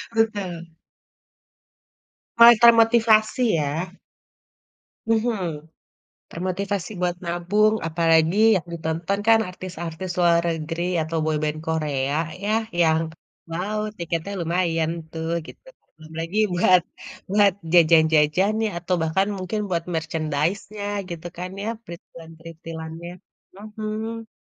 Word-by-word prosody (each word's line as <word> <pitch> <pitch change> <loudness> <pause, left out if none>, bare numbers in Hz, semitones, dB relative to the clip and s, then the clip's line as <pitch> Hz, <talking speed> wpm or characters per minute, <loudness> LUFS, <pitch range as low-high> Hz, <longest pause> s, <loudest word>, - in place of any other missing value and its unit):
Betul. 200 -7 -1 1.7
Kata 235 0 +9
motivasi 225 0 +3
ya. 160 +5 -2 1.1
Mhm, 195 -9 -1 0.6
termotivasi 185 +1 -3
buat 175 -1 0
nabung, 180 +5 +1
apalagi 165 +1 +2 0.2
yang 175 -2 -2
ditonton 165 +4 -2
kan 225 0 +6
artis-artis 180 -1 -7
luar 170 -1 +4
negeri 165 +1 -4 0.2
atau 160 +1 -3
boyband 155 0 -1
Korea 145 -4 -1 0.3
yah 215 +2 +1 0.2
yang, 160 0 +3 0.5
wow 195 +6 -3 0.2
tiketnya 170 +3 -3
lumayan 165 -1 0 0.2
tuh, 160 0 -4 0.2
gitu. - - -14 0.3
Belum 160 0 -14
lagi 165 +5 -4 0.2
buat 180 0 +5 0.5
buat 200 -1 +4 0.2
jajan-jajannya 165 +5 +4
atau 180 +2 -1
bahkan 190 +5 +1
mungkin 185 +3 -3
buat 170 -2 -1
merchandise-nya 160 +6 -2 0.3
gitu 170 0 -6
kan 180 +1 -5
ya, - - -4 0.2
printilan-printilannya, 165 -1 -10 0.5
mhm. 215 +1 -6
175 Hz, 100 wpm, -23 LUFS, 160-205 Hz, 1.7 s, Kata